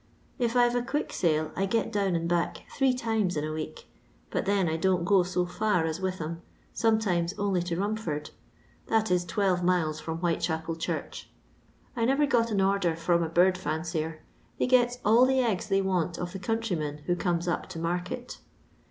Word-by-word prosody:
If 240 Hz, -1 st, 0 dB
I 245 Hz, -1 st, +6 dB
've 240 Hz, -, -1 dB
a 245 Hz, -, +1 dB
quick 290 Hz, +5 st, -2 dB
sale 155 Hz, -2 st, +1 dB
I 195 Hz, -, 0 dB
get 230 Hz, +3 st, 0 dB
down 200 Hz, -4 st, +1 dB
and 165 Hz, 0 st, -1 dB
back 170 Hz, 0 st, -1 dB
three 270 Hz, -1 st, +3 dB
times 220 Hz, -8 st, 0 dB
in 150 Hz, -, -1 dB
a 155 Hz, 0 st, -3 dB
week, 155 Hz, 0 st, -6 dB, 0.5 s
but -, -, -1 dB
then 200 Hz, -3 st, +2 dB
I 160 Hz, -, 0 dB
don't 180 Hz, +1 st, +1 dB
go 195 Hz, 0 st, +5 dB
so 180 Hz, 0 st, 0 dB
far 180 Hz, -1 st, 0 dB
as 160 Hz, +3 st, -3 dB
Witham, 170 Hz, -3 st, -3 dB, 0.3 s
sometimes 205 Hz, -6 st, +1 dB
only 200 Hz, -3 st, +1 dB
to 170 Hz, -1 st, -2 dB
Rumford; 200 Hz, -8 st, -2 dB, 0.6 s
that 220 Hz, -3 st, +1 dB
is 180 Hz, -1 st, +3 dB
12 185 Hz, -1 st, 0 dB
miles 165 Hz, -4 st, +1 dB
from 160 Hz, 0 st, -4 dB
Whitechapel 165 Hz, -1 st, -1 dB
Church. 165 Hz, -, -4 dB, 0.7 s
I 230 Hz, -2 st, +1 dB
never 275 Hz, +4 st, +3 dB
got 235 Hz, -4 st, +2 dB
an 205 Hz, -3 st, +1 dB
order 190 Hz, -3 st, +2 dB
from 170 Hz, +1 st, +1 dB
a 165 Hz, -, -1 dB
bird 180 Hz, +2 st, +3 dB
fimcier; 160 Hz, -2 st, -3 dB, 0.4 s
they -, -, +1 dB
gets 245 Hz, -1 st, +3 dB
all 225 Hz, +4 st, +6 dB
the 265 Hz, 0 st, +2 dB
eggs 215 Hz, -6 st, 0 dB
they 195 Hz, 0 st, +2 dB
want 180 Hz, -2 st, 0 dB
of 175 Hz, 0 st, -4 dB
the 195 Hz, -, -5 dB
conntrymen 180 Hz, -8 st, -2 dB
who 175 Hz, -, +1 dB
comes 175 Hz, -1 st, -1 dB
up 170 Hz, -, -2 dB
to 185 Hz, -, -7 dB
market. 180 Hz, +8 st, -3 dB
180 Hz, 190 wpm, -28 LUFS, 165-215 Hz, 0.7 s, I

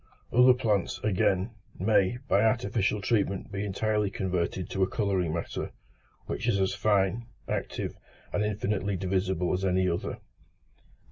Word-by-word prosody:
Other 125 Hz, +1 st, +7 dB
plants, 105 Hz, -6 st, 0 dB
again, 95 Hz, 0 st, +2 dB, 0.3 s
may, 100 Hz, +3 st, +3 dB
by 100 Hz, -, +4 dB
artificial 110 Hz, -2 st, +1 dB
treatment 100 Hz, -2 st, 0 dB
be 100 Hz, 0 st, -3 dB
entirely 105 Hz, +1 st, 0 dB
converted 90 Hz, -2 st, -2 dB
to 95 Hz, -, -2 dB
a 95 Hz, -, +3 dB
colouring 95 Hz, -6 st, 0 dB
matter, 85 Hz, +1 st, -3 dB, 0.6 s
which -, -, -3 dB
is 100 Hz, -, +2 dB
as 95 Hz, 0 st, +1 dB
fine, 105 Hz, +2 st, +1 dB, 0.2 s
active, -, -, -3 dB, 0.4 s
and 105 Hz, -, +1 dB
infinitely 100 Hz, -1 st, -1 dB
divisible 95 Hz, -1 st, 0 dB
as 90 Hz, +1 st, -1 dB
any 95 Hz, 0 st, +2 dB
other. 85 Hz, -1 st, -2 dB
100 Hz, 135 wpm, -28 LUFS, 95-105 Hz, 0.6 s, Other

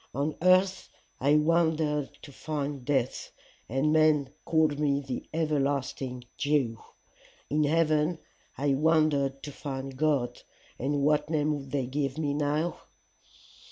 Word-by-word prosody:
On 145 Hz, +2 st, -1 dB
earth 185 Hz, +1 st, +3 dB, 0.3 s
I 140 Hz, +3 st, +3 dB
wandered 155 Hz, -2 st, +2 dB
to 145 Hz, -, -10 dB
find 145 Hz, -2 st, -4 dB
death, 130 Hz, -2 st, -1 dB, 0.4 s
and 135 Hz, +6 st, +1 dB
men 155 Hz, -3 st, +3 dB
called 155 Hz, -3 st, +2 dB
me 140 Hz, -2 st, +2 dB
the 135 Hz, -3 st, -6 dB
everlasting 140 Hz, -5 st, -1 dB, 0.2 s
Jew; 140 Hz, -6 st, +1 dB, 0.7 s
in 150 Hz, +1 st, +2 dB
heaven 155 Hz, +1 st, +2 dB, 0.4 s
I 140 Hz, 0 st, +1 dB
wandered 145 Hz, -2 st, +2 dB
to 145 Hz, -, -6 dB
find 135 Hz, -1 st, -6 dB
God, 135 Hz, -5 st, 0 dB, 0.4 s
and 140 Hz, +2 st, 0 dB
what 150 Hz, +1 st, +2 dB
name 155 Hz, -1 st, +1 dB
would 135 Hz, -2 st, -8 dB
they 135 Hz, -2 st, -1 dB
give 135 Hz, +1 st, -2 dB
me 145 Hz, -3 st, -1 dB
now? 150 Hz, +3 st, -1 dB
145 Hz, 125 wpm, -28 LUFS, 135-155 Hz, 0.7 s, earth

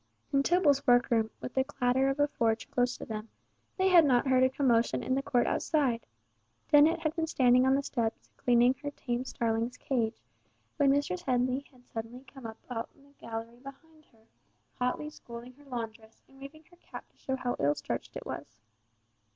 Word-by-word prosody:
In 275 Hz, -, +4 dB
Tibble's 290 Hz, -3 st, +3 dB
workroom, 240 Hz, -2 st, +4 dB
with 250 Hz, -, -6 dB
the 265 Hz, -, +2 dB
clatter 265 Hz, -1 st, +1 dB
of 270 Hz, +1 st, -2 dB
a 290 Hz, -, +4 dB
forge 230 Hz, -5 st, -1 dB
close 245 Hz, 0 st, +1 dB
to -, -, -8 dB
them, 215 Hz, 0 st, -6 dB, 0.5 s
they 380 Hz, 0 st, +3 dB
had 350 Hz, -3 st, +8 dB
not 255 Hz, -4 st, +3 dB
heard 260 Hz, -1 st, +3 dB
a 260 Hz, -, +5 dB
commotion 250 Hz, -4 st, +1 dB
in 260 Hz, -, 0 dB
the 270 Hz, -, +1 dB
court 245 Hz, -3 st, +1 dB
outside. 265 Hz, -7 st, 0 dB, 0.6 s
Dennet 315 Hz, +3 st, +5 dB
had 310 Hz, 0 st, -1 dB
been 325 Hz, -2 st, -1 dB
standing 255 Hz, -3 st, +4 dB
on 265 Hz, -, +4 dB
the 280 Hz, -, 0 dB
steps 230 Hz, -4 st, -3 dB
cleaning 245 Hz, +1 st, +4 dB
her 290 Hz, -, -3 dB
tame 245 Hz, -3 st, -3 dB
starling's 230 Hz, 0 st, -1 dB
cage, 235 Hz, -5 st, -1 dB, 0.6 s
when 285 Hz, -3 st, +4 dB
Mistress 275 Hz, -10 st, +1 dB
Headley 255 Hz, +2 st, 0 dB
had 250 Hz, -2 st, -22 dB
suddenly 230 Hz, +3 st, -7 dB
come 265 Hz, -1 st, -10 dB
out 220 Hz, -, -9 dB
on 230 Hz, -2 st, -4 dB, 0.2 s
the 280 Hz, 0 st, -23 dB
gallery 230 Hz, +1 st, -7 dB
behind 300 Hz, +4 st, -14 dB
her, 225 Hz, -2 st, -28 dB, 0.5 s
hotly 250 Hz, +4 st, -1 dB
scolding 240 Hz, -2 st, -10 dB
her 290 Hz, +3 st, -20 dB
laundress, 225 Hz, -3 st, -7 dB
and 270 Hz, -, -20 dB
waving 305 Hz, +3 st, -11 dB
her 350 Hz, -, -19 dB
cap -, -, -11 dB
to -, -, -37 dB
show 265 Hz, -, -2 dB
how 250 Hz, -1 st, -2 dB
ill 145 Hz, +1 st, +2 dB
starched -, -, -5 dB
it -, -, -6 dB
was. 115 Hz, +1 st, -7 dB
255 Hz, 190 wpm, -30 LUFS, 235-280 Hz, 0.6 s, had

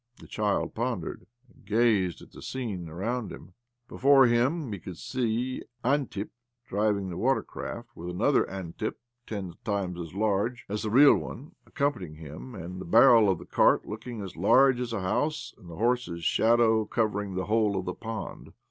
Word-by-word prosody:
The -, -, -13 dB
child 105 Hz, -1 st, -1 dB
pondered, 120 Hz, +1 st, -3 dB, 0.2 s
and 125 Hz, -, -24 dB
gazed 105 Hz, -5 st, +1 dB
at -, -, -16 dB
the -, -, -12 dB
scene 105 Hz, -10 st, -5 dB
around 110 Hz, +7 st, -3 dB
him. -, -, -11 dB, 0.3 s
Before 135 Hz, 0 st, +5 dB
him 125 Hz, +4 st, +1 dB
he 100 Hz, -, -5 dB
could 90 Hz, -1 st, -9 dB
see 125 Hz, 0 st, -2 dB, 0.2 s
Antip 130 Hz, -7 st, 0 dB, 0.3 s
driving 100 Hz, -2 st, 0 dB
the 85 Hz, -, -5 dB
watercart, 125 Hz, -2 st, -2 dB
with 85 Hz, -3 st, -7 dB
another 90 Hz, -, +2 dB
Antip, 95 Hz, +2 st, -5 dB, 0.3 s
ten 95 Hz, -5 st, -5 dB
times 95 Hz, -4 st, -2 dB
as 85 Hz, 0 st, -7 dB
large 110 Hz, +4 st, 0 dB
as 105 Hz, +1 st, -3 dB
the 110 Hz, -, -2 dB
real 140 Hz, +6 st, +7 dB
one, 140 Hz, +5 st, -8 dB
accompanying 110 Hz, -, -2 dB
him, 80 Hz, -, -9 dB
and 90 Hz, 0 st, -7 dB
the -, -, -7 dB
barrel 115 Hz, +1 st, +6 dB
of 95 Hz, -, +2 dB
the 90 Hz, -, -11 dB
cart -, -, +3 dB
looking 110 Hz, 0 st, -6 dB
as 95 Hz, -, -8 dB
large 130 Hz, +8 st, +5 dB
as 125 Hz, -2 st, -3 dB
a 110 Hz, -4 st, -2 dB
house, 150 Hz, +12 st, -1 dB
and 90 Hz, -6 st, -15 dB
the 85 Hz, -, -8 dB
horse's 115 Hz, -6 st, 0 dB
shadow 115 Hz, +2 st, +3 dB
covering 105 Hz, -3 st, -1 dB
the 95 Hz, -, -2 dB
whole 105 Hz, -2 st, +2 dB
of 95 Hz, -, -3 dB
the -, -, -3 dB
pond. 115 Hz, -1 st, -7 dB
110 Hz, 175 wpm, -28 LUFS, 95-120 Hz, 0.3 s, real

